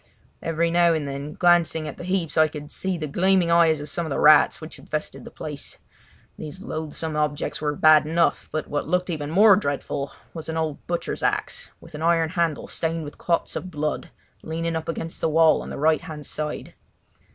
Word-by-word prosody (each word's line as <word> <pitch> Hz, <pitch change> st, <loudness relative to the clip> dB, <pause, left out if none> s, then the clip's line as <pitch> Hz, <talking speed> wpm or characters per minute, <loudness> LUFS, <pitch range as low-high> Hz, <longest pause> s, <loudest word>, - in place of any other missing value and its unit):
Every 165 Hz, +1 st, 0 dB
now 170 Hz, 0 st, +4 dB
and 150 Hz, -3 st, -2 dB
then, 140 Hz, +2 st, -5 dB
glancing 170 Hz, -3 st, +3 dB
at -, -, -7 dB
the -, -, -6 dB
heaps, 185 Hz, -3 st, -1 dB
I 155 Hz, 0 st, +5 dB
could 150 Hz, -1 st, -9 dB
see 190 Hz, -2 st, -1 dB
the 155 Hz, -, -3 dB
gleaming 180 Hz, +3 st, +2 dB
eyes 165 Hz, -2 st, +4 dB
of 145 Hz, -, -7 dB
some 170 Hz, +4 st, -2 dB
of 160 Hz, -, -5 dB
the 140 Hz, -, -2 dB
rats 150 Hz, 0 st, +6 dB
which 155 Hz, -1 st, -10 dB
infested 155 Hz, 0 st, -5 dB
the -, -, -8 dB
place. 145 Hz, -2 st, -7 dB, 0.6 s
These 160 Hz, +5 st, -7 dB
loathsome 160 Hz, -4 st, -4 dB
objects 150 Hz, -1 st, -1 dB
were 150 Hz, -1 st, -1 dB
bad 155 Hz, 0 st, +6 dB
enough, 165 Hz, +2 st, +1 dB
but 155 Hz, 0 st, -2 dB
what 145 Hz, -, -2 dB
looked 180 Hz, +2 st, 0 dB
even 150 Hz, -3 st, -4 dB
more 200 Hz, +5 st, +7 dB
dreadful 140 Hz, -5 st, -2 dB, 0.2 s
was 160 Hz, -1 st, -7 dB
an 160 Hz, -, -2 dB
old 160 Hz, -3 st, -2 dB
butcher's 175 Hz, 0 st, -3 dB
axe -, -, -1 dB
with -, -, -15 dB
an 150 Hz, -, -7 dB
iron 165 Hz, -1 st, +2 dB
handle 165 Hz, -3 st, -1 dB
stained 165 Hz, 0 st, -2 dB
with 145 Hz, -, -10 dB
clots 170 Hz, -1 st, 0 dB
of 185 Hz, -, -4 dB
blood 150 Hz, -2 st, -3 dB, 0.3 s
leaning 165 Hz, +1 st, -3 dB
up 160 Hz, 0 st, -4 dB
against 165 Hz, 0 st, -4 dB
the 165 Hz, -, +2 dB
wall 160 Hz, 0 st, +4 dB
on -, -, -8 dB
the -, -, -6 dB
right 155 Hz, +2 st, +2 dB
hand 150 Hz, -2 st, -8 dB
side. 150 Hz, +2 st, -4 dB
160 Hz, 205 wpm, -24 LUFS, 150-170 Hz, 0.6 s, more